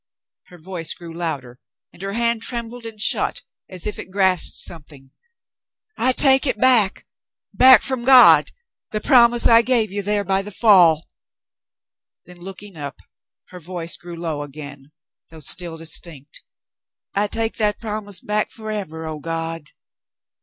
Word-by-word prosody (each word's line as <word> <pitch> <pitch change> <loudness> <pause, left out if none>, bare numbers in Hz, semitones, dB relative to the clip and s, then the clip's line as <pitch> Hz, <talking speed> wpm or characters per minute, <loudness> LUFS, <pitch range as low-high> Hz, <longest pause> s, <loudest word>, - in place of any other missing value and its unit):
Her 180 - -15
voice 170 -1 -5
grew 170 -2 -11
louder, 140 -7 -5 0.3
and - - -15
her 195 0 -4
hand 235 0 0
trembled 235 0 -3
and 220 -2 -10
shut 215 - 0 0.3
as 185 -2 -9
if 210 - -4
it - - -8
grasped 185 -2 0
something. 145 -5 -5 0.8
"I 255 +2 +1
take 270 +1 +4
it - - 0
back 240 -7 +2 0.3
— - - -63
back 260 0 +7
from 260 -3 -3
God 255 0 +7 0.2
— - - -72
the 215 - -2
promise 240 -1 +4
I 230 0 +7
gave 230 -4 0
you 205 +1 -2
there 205 +1 0
by 195 0 0
the 200 - -8
fall." 180 -7 +4 1.2
Then, 180 +1 -13
looking 190 +1 -11
up, 145 0 -6 0.5
her 180 - -11
voice 170 0 -4
grew 175 -1 -10
low 160 -3 -4
again, 145 -1 -10 0.4
though 160 - -13
still 165 +3 -1
distinct. 160 -3 -5 0.7
"I 205 +1 +1
take 225 +2 -3
that 210 -2 0
promise 210 -3 -6
back 210 0 -1
forever, 205 -8 -6
oh, 155 -1 -6
God 165 -1 -5
190 Hz, 155 wpm, -20 LUFS, 165-225 Hz, 1.2 s, back